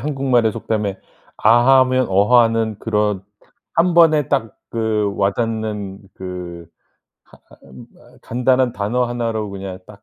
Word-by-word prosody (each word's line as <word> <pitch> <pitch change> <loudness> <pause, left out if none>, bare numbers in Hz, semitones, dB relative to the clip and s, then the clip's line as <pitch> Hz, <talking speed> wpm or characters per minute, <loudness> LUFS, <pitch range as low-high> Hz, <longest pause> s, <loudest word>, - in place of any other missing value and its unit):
한국말의 130 -5 +1
속담에 105 -3 -3 0.4
아 120 +4 +5
하면 130 0 +2
어 100 +6 +4
하는 115 -2 0
그런 105 -3 -1 0.5
1 170 +1 +2
번에 155 -4 +4
딱 130 -6 -1
그 110 -3 -1
와 100 0 +2
닿는 110 -3 -4
그 90 -2 -8 0.8
하 - - -17
아 - - -35
음 65 - -12
어 - - -21
간단한 125 +1 +1
단어 110 +5 -1
1 120 -1 -2
로 110 -2 -4
그냥 95 -1 -7
딱 100 0 -15
110 Hz, 215 characters per minute, -19 LUFS, 100-125 Hz, 0.8 s, 아